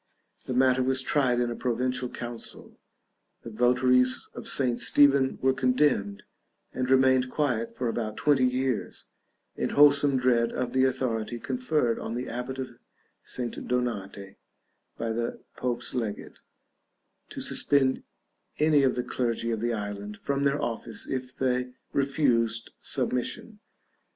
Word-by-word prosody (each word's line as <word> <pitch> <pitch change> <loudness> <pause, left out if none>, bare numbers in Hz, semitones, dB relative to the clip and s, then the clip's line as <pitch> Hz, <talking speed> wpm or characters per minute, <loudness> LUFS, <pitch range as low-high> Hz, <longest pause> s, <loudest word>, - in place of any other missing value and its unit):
The 130 - -2
matter 130 0 +4
was 130 0 +1
tried 130 -4 +2
in 120 -1 0
a - - -4
provincial 125 +1 -1
council; 120 -1 -7 0.6
the 115 - -8
votaries 125 +2 +2
of - - -6
St. 125 -3 +2
Stephen 140 -2 +4
were 130 0 +4
condemned, 125 -6 +1 0.5
and 130 0 -2
remained 130 -1 +4
quiet 125 -6 -1
for 125 - -1
about 110 -2 -3
twenty 140 -3 +3
years, 125 -1 -2 0.4
in - - -1
wholesome 145 -1 +6
dread 120 -2 +2
of 125 -1 -3
the 130 0 +4
authority 120 -3 -1
conferred 150 - 0
on 115 - -4
the 125 +1 -4
abbot 125 +2 -4
of 130 -2 -6 0.4
St. 125 -2 -5
Donate, 100 -6 -3 0.6
by 115 - -2
the 115 +1 -3 0.2
Pope's 125 -1 -3
legate, 115 -5 -4 0.9
to - - -7
suspend 135 -2 +1 0.6
any 150 -2 +4
o 135 - +5
the 125 -1 -2
clergy 115 -2 -2
of 110 - -1
the 120 +1 0
island 105 -1 -5
from 140 0 -1
their 140 +1 +2
office 115 -3 -4
if 130 -1 -4
they 125 -1 0 0.2
refused 120 -5 +1
submission. 165 - -2
125 Hz, 135 wpm, -27 LUFS, 115-130 Hz, 0.9 s, wholesome